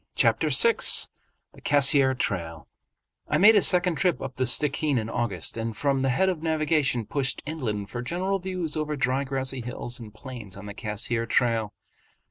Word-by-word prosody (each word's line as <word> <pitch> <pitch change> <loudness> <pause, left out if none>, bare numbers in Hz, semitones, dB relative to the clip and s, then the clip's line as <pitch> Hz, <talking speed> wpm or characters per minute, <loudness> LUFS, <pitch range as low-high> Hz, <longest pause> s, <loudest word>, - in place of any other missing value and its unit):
Chapter - - +2
VI 465 -1 +5 0.8
The - - -17
Cassiar 140 -2 +4
Trail 85 -7 -3 0.6
I 150 - +1
made 210 +6 +7
a 205 - +5
second 180 -3 +3
trip 180 -3 +1
up 135 -1 -7
the 130 - 0
Stickeen 145 +2 +1
in 110 -1 -3
August 115 -7 -2
and 115 -1 -4
from 140 -2 0
the 135 - +1
head 185 +10 +1
of 180 -5 -2
navigation 155 -6 0
pushed 135 +2 -2
inland 115 -10 -4
for 120 - -4
general 185 +9 -2
views 180 -4 -4
over 155 -1 -2
dry 135 0 0
grassy 135 -1 -3
hills 120 +1 -5
and 110 -3 -10
plains 110 -4 -9
on 100 - -10
the 105 - -7
Cassiar 115 +2 -3
trail. 115 -4 0
135 Hz, 175 wpm, -25 LUFS, 115-155 Hz, 0.8 s, made